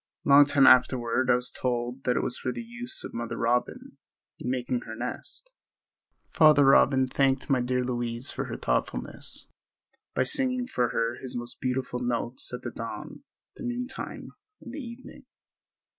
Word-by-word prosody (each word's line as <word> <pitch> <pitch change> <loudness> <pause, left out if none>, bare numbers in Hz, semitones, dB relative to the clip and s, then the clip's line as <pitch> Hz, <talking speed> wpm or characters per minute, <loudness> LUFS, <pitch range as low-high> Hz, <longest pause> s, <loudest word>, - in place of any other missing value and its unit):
A - - -2
long 140 +1 +8
time 140 -2 +5
afterward 125 0 +4
I - - +6
was 125 0 -2
told 125 +1 -3
that 125 - +2
it - - 0
was 125 - 0
for 130 - -3
the 235 - -6
use 240 +1 -5
of - - -8
Mother 115 0 -4
Robin 120 +1 -1 0.4
in 125 - -4
making 130 - -1
her - - -6
nest. - - -6 0.8
Father 150 -3 +6
Robin 135 -1 +5
thanked 135 +1 +1
my 130 -2 +3
dear 125 +1 0
Louise 120 0 -3
for - - -4
her - - -5
thoughtfulness - - -3 0.7
by 130 - +3
singing 255 - +1
for 125 - 0
her 115 +1 -1
his 130 -2 -3
most 120 0 -5
beautiful 125 -1 -2
notes 120 0 -1
at 125 - -6
the 120 - -4
dawn, 115 -1 -7 0.4
the - - -8
noon 245 0 -2
time 265 - -7 0.3
and 245 - -10
the 300 - -5
evening. 235 0 -11
130 Hz, 175 wpm, -27 LUFS, 120-145 Hz, 0.8 s, long